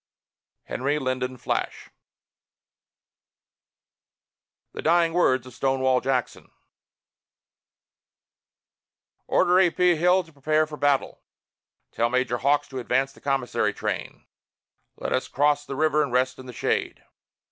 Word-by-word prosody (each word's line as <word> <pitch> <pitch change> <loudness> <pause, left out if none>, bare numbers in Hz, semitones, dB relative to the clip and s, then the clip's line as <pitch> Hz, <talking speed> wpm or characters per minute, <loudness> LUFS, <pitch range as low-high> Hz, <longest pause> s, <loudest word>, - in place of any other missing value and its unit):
HENRY 140 +3 -2
LYNDEN 130 -2 -2
FLASH. - - -3 2.8
THE - - -6
DYING 165 0 +3
WORDS 130 -8 +2
OF 130 - -12
STONEWALL 130 0 +1
JACKSON 130 -2 -2 2.8
"Order 180 +1 +3
A. 185 -2 +5
P. 180 0 +2
Hill 180 +3 +3
to 165 - -20
prepare 155 +2 +1
for 150 -1 -9
battle." 145 -2 0 0.7
"Tell 115 +1 0
Major 125 -1 0
Hawks 145 +2 +2
to 130 - -5
advance 130 +3 0
the - - -19
commissary 135 -3 -1
train." - - -5 0.7
"Let - - -3
us - - -1
cross 145 +1 +1
the 135 - -5
river 150 0 +2
and 125 - -1
rest 130 +1 0
in 130 - -10
the 125 - -8
shade." - - -2
135 Hz, 120 wpm, -25 LUFS, 130-155 Hz, 2.8 s, A